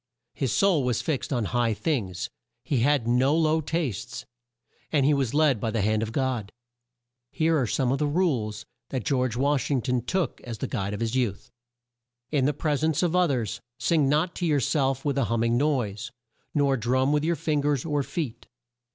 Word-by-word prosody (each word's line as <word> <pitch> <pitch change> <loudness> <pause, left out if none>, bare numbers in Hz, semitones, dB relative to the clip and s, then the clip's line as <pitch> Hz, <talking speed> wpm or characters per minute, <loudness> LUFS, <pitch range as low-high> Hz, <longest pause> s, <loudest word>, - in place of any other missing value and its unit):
His 135 -5 -1
soul 185 - +3
was 125 -3 0
fixed 150 -3 -2
on 120 -5 0
high 115 0 +1
things; 105 - -2 0.4
he 135 +2 0
had; 135 -1 +2
no 130 +5 +3
low 160 0 +2
tastes; 135 - -3 0.7
and 145 -4 +3
he 150 - +4
was 135 -3 0
led 150 -6 +3
by 115 - 0
the 110 -2 0
hand 110 +1 +1
of 110 0 -3
God. 125 -5 -1 0.8
Here 160 +1 +2
are 130 -6 +1
some 125 +2 +1
of 135 - 0
the 150 - +1
rules 130 - 0 0.2
that 130 -5 -3
George 130 -4 +1
Wash 140 +1 +1
ing 140 -3 +2
ton 125 -2 0
took 170 +4 -2
as 120 -2 -6
the - - -3
guide 100 -3 -3
of 100 - -7
his 115 0 -1
youth. 120 -7 -1 0.8
"In 140 -4 +2
the 145 - +3
pres 150 0 -1
ence 160 +1 +2
of 175 0 +1
o 180 -1 +4
thers 120 - -2 0.2
sing 155 -5 +2
not 155 +5 +1
to 175 - -1
your 150 -3 +3
self 135 -1 0
with 140 -1 +1
a 135 - +2
hum 115 0 0
ming 115 0 +2
noise, 120 -7 0 0.5
nor 140 -2 +3
drum 130 +4 +1
with 150 0 +2
your 170 +2 +1
fin 155 -1 0
gers 145 -2 0
or 150 -3 0
feet. 135 -5 -5
135 Hz, 205 wpm, -26 LUFS, 115-150 Hz, 0.8 s, he